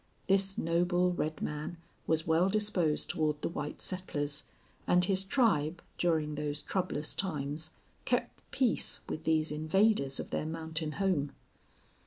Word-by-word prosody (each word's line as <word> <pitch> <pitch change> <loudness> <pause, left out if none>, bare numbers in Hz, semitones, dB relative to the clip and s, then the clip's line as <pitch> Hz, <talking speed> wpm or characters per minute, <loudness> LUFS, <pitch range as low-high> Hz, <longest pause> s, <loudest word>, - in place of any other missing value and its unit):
This 195 0 +2
noble 175 +2 +2
red 155 -3 -2
man 150 +3 -3 0.3
was 160 0 +2
well 165 +4 +3
disposed 195 -7 +1
toward 155 -2 0
the - - +1
white 150 -3 -5
settlers, 145 -6 -2 0.4
and 180 0 +5
his 190 0 +2
tribe, 185 - +2 0.2
during 160 -3 +2
those 150 0 -3
troublous 180 -5 -1
times, 155 -3 -2 0.3
kept - - -1
peace 255 -4 +1
with 155 - -5
these 160 -1 +2
invaders 155 -2 +2
of - - -5
their 155 - -1
mountain 160 -1 -3
home. 160 -8 0
160 Hz, 135 wpm, -32 LUFS, 150-185 Hz, 0.4 s, and